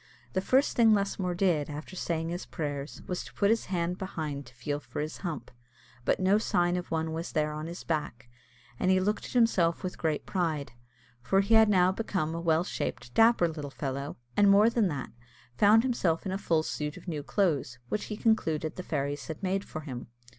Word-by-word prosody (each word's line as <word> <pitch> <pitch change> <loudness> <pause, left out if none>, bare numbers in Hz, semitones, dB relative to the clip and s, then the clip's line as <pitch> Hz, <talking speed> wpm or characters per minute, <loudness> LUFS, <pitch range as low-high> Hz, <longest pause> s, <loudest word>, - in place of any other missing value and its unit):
The 190 - +1
first 265 +8 +2
thing 225 -2 +6
Lusmore 195 -3 -1
did, 175 -6 +1
after 150 +5 -7
saying 165 -2 -2
his 175 +2 -5
prayers, 145 -3 -5
was 180 - -3
to - - -12
put 200 +1 +3
his 225 - +1
hand 180 -1 -2
behind 155 - -4
to 120 - -15
feel 145 +5 -3
for - - -7
his 155 +1 -3
hump, 165 -7 -5 0.5
but - - +2
no 195 +3 +4
sign 175 -5 +1
of 180 0 -4
one 160 0 -1
was 165 +2 -4
there 150 0 +1
on 155 +1 -5
his 170 +2 -7
back, 150 -7 -3 0.5
and 185 - +1
he 185 0 +5
looked 210 +3 0
at - - -8
himself 200 -9 +3
with 185 - -4
great 155 -2 -1
pride, 155 -8 -1 0.5
for 195 +11 +3
he 200 +3 +1
had 220 -1 +7
now 185 -2 +5
become 190 -6 -2
a 165 - -3
well 165 0 +3
shaped 120 -8 -4
dapper 225 -6 +5
little 155 -3 -5
fellow, 140 0 -4 0.2
and 205 -1 +5
more 205 +3 +6
than 230 -4 +2
that, 145 -6 -4 0.4
found 210 - +6
himself 195 -11 0
in 190 - -2
a 190 - -1
full 165 -5 +1
suit 150 -1 -3
of - - -13
new 155 -4 -2
clothes, 145 - 0
which 210 - -2
he 210 - -5
concluded 165 -10 +1
the - - -3
fairies 145 -4 -3
had 160 +4 -7
made 195 +1 0
for 155 - -7
him. 130 -5 -7
170 Hz, 210 wpm, -29 LUFS, 150-195 Hz, 0.5 s, had